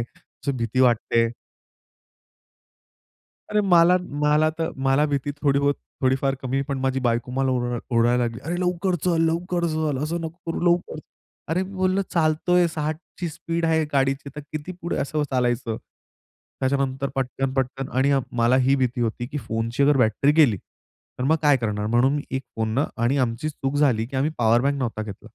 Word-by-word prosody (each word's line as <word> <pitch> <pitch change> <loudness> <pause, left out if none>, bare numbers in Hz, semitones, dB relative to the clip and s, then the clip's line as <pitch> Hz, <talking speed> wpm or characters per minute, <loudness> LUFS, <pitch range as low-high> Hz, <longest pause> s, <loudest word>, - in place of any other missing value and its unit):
अशी 120 +3 -6
भीती 115 +2 -1
वाटत 120 -3 +2
आहे. 115 0 +4 2.2
अरे, 210 0 +3
मला, 180 -2 +5 0.2
मला 150 +1 +3
त - - 0
मला 135 +2 +2
भीती 145 -1 -1
थोडी 140 -2 +3
बहुत, 140 0 +2 0.3
थोडीफार 135 +1 +1
कमी 130 +1 -1
पण 140 -2 -2
माझी 135 0 0
बायको 120 -1 0
मला 135 +1 +1
ओर 120 -1 -1
ओरडायला 120 +1 +3
लागली. 115 -1 -3
"अरे 170 +3 -2
लवकर 180 +1 0
चल, 170 -3 +2
लवकर 175 +1 -1
चल, 155 -3 -1
असं 165 +3 -2
नको 165 0 -6
करू - - -3
लवकर." 175 -2 +1 0.5
अरे 175 +3 +1
मी 190 +1 -7
बोललं, 185 +1 +1
"चालत 160 +1 +1
आहे 180 0 +5
60ची 155 +2 -4
स्पीड 165 +1 -3
आहे 160 -1 +2
गाडीची, 135 0 +1
तर - - -4
किती 155 +4 -5
पुढे 170 - -2
असं 150 +2 -1
चालायचं?" 120 -3 0 0.8
त्याच्यानंतर 135 0 0
पटकन, 135 0 -2
पटकन 135 0 -2
आणि 135 +2 +3
अ, 140 - +4
मला 120 +2 +3
ही 135 - +5
भीती 125 -2 0
होती, 120 +1 -1
की 145 +3 -5
फोनची 115 +1 -2
अगर 145 0 +4
बॅटरी 125 +4 +3
गेली, 150 -10 +5 0.6
तर 125 - -1
मग 155 +4 +3
काय 145 -2 +5
करणार? 105 -3 -2
म्हणून 120 +5 +3
मी 145 - -2
एक 130 0 -2
फोन 110 -1 -1
न 145 - +3 0.2
आणि 125 +4 +2
आमची 125 +3 -1
चूक 145 -2 -3
झाली 125 -7 +2
की 135 +3 -6
आम्ही 140 +4 +1
पॉवरबँक 120 +5 +3
नव्हता 115 -4 -2
घेतला. 105 -2 -9
135 Hz, 180 wpm, -24 LUFS, 125-155 Hz, 2.2 s, मला